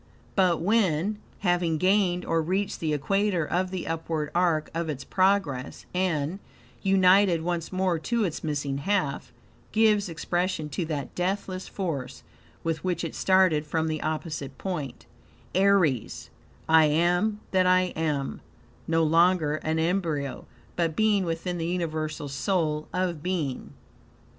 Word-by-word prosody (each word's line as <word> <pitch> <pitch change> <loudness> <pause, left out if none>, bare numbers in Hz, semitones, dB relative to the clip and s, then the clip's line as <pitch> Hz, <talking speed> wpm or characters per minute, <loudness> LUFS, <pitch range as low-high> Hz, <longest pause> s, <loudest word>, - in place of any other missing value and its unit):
But 185 -4 +3
when, 200 0 +1 0.2
having 175 -4 +1
gained 185 0 +2
or 165 0 +1
reached 190 +5 -1
the 160 -2 -1
equator 180 +4 +1
of 180 +4 0
the 185 -2 -4
upward 160 -2 -3
arc 170 -3 +1
of 165 0 -2
its 135 -3 -4
progress, 185 -9 0
and, 180 -1 0 0.4
united 190 -2 +4
once 170 -1 -2
more 185 -3 0
to 235 +7 0
its 170 -5 -3
missing 145 -3 -2
half, 175 -7 -1 0.4
gives 215 -2 +3
expression 175 -1 -2
to 170 +3 -2
that 150 -3 -4
deathless 185 0 -2
force 140 -9 -4 0.4
with 165 -1 -2
which 180 -2 -1
it 165 - -4
started 185 -5 +3
from 160 +1 0
the 155 -1 -2
opposite 155 -4 -4
point, 155 -9 -5 0.5
Aries: 185 - +2 0.4
"I 160 -1 +6
AM 175 +7 +2
THAT 185 -1 +3
I 185 0 +5
AM;" 150 -4 -2 0.5
no 165 0 +2
longer 165 -1 +3
an 160 +1 -2
embryo, 160 -5 -1 0.3
but 165 -3 0
being 210 -3 +2
within 170 +1 -3
the 165 - -2
UNIVERSAL 155 -4 -2
SOUL 155 0 -1
of 180 -4 -1
being. 165 -7 -3
170 Hz, 135 wpm, -26 LUFS, 155-185 Hz, 0.5 s, I